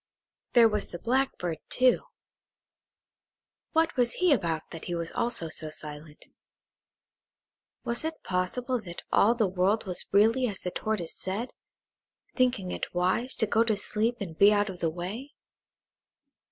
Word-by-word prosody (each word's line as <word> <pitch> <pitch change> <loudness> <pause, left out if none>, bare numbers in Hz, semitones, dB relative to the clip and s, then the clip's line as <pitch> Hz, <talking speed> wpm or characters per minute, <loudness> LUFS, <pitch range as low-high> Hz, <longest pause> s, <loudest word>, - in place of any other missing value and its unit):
There 235 -2 +7
was 210 -2 -1
the 175 - -7
Blackbird, 230 - -1 2.2
too;–what 325 +2 +2
was 245 -2 +4
he 360 -4 +3
about 165 - -1
that 165 - -8
he 175 - -3
also 170 +4 -2
was 155 -1 -1
silent? 150 0 -9 1.6
Was 235 +4 -1
it 320 0 -5
possible 235 +7 -1
that 175 -4 -9
all 230 +4 +4
the 230 -2 +2
world 190 +4 +1
was 180 -2 -2
really 225 +6 +4
as 200 -4 -4
the 180 - -3
Tortoise 210 -6 -2
said, 205 +7 -2 0.8
thinking 245 -8 +1
it - - -5
wise 185 +8 0
to - - +1
go 220 +2 +3
to 220 -3 0
sleep 220 +4 0
and 180 -6 -6
be 200 +5 +6
out 205 -1 +1
of 180 - -11
the 165 - +1
way? 190 - -6
205 Hz, 140 wpm, -28 LUFS, 175-240 Hz, 2.2 s, There